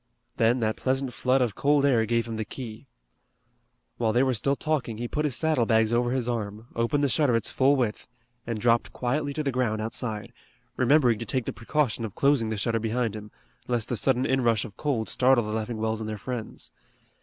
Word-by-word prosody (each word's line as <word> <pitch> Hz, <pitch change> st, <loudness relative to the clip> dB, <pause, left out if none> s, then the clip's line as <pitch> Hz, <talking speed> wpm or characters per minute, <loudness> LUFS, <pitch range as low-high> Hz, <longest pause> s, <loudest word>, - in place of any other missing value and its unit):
Then 120 Hz, +2 st, +3 dB
that 110 Hz, -1 st, 0 dB
pleasant 130 Hz, -1 st, -1 dB
flood 130 Hz, +1 st, +2 dB
of 115 Hz, -4 st, -1 dB
cold 145 Hz, +3 st, +2 dB
air 115 Hz, -5 st, +3 dB
gave 115 Hz, 0 st, +1 dB
him 115 Hz, -1 st, -4 dB
the 110 Hz, -, -1 dB
key. 115 Hz, +2 st, -8 dB, 1.1 s
While 110 Hz, -2 st, +1 dB
they 125 Hz, +3 st, +4 dB
were 130 Hz, -1 st, +2 dB
still 135 Hz, +5 st, +1 dB
talking 135 Hz, -8 st, -2 dB
he 120 Hz, +1 st, -3 dB
put 150 Hz, +5 st, -1 dB
his 140 Hz, -5 st, 0 dB
saddle 140 Hz, -3 st, +1 dB
bags 110 Hz, 0 st, +3 dB
over 120 Hz, +1 st, +2 dB
his 125 Hz, -1 st, -1 dB
arm, 110 Hz, -1 st, -4 dB
opened 115 Hz, +5 st, +1 dB
the -, -, +4 dB
shutter 130 Hz, 0 st, +2 dB
its 115 Hz, -, -1 dB
full 135 Hz, +2 st, +3 dB
width, 120 Hz, -6 st, -2 dB, 0.4 s
and 115 Hz, -2 st, -2 dB
dropped 115 Hz, +1 st, +2 dB
quietly 140 Hz, +4 st, -1 dB
to 155 Hz, -, -1 dB
the 140 Hz, -, 0 dB
ground 120 Hz, -4 st, 0 dB
outside, 110 Hz, -1 st, -4 dB, 0.4 s
remembering 130 Hz, -3 st, +3 dB
to 115 Hz, -, -4 dB
take 130 Hz, -4 st, -1 dB
the -, -, -3 dB
precaution 120 Hz, -1 st, -1 dB
of 110 Hz, -4 st, -5 dB
closing 135 Hz, -5 st, +2 dB
the 110 Hz, -, -2 dB
shutter 115 Hz, +2 st, 0 dB
behind 115 Hz, 0 st, -1 dB
him, 105 Hz, -1 st, -8 dB, 0.4 s
lest 120 Hz, -3 st, -1 dB
the 125 Hz, -, 0 dB
sudden 130 Hz, +2 st, +1 dB
inrush 120 Hz, -5 st, +2 dB
of 105 Hz, -, -11 dB
cold 125 Hz, -7 st, -1 dB
startle 130 Hz, -1 st, +3 dB
the 105 Hz, 0 st, -4 dB
Leffingwells 110 Hz, 0 st, -2 dB
and 110 Hz, -1 st, -4 dB
their 110 Hz, -, -4 dB
friends. 120 Hz, +1 st, -6 dB
120 Hz, 210 wpm, -26 LUFS, 110-130 Hz, 1.1 s, they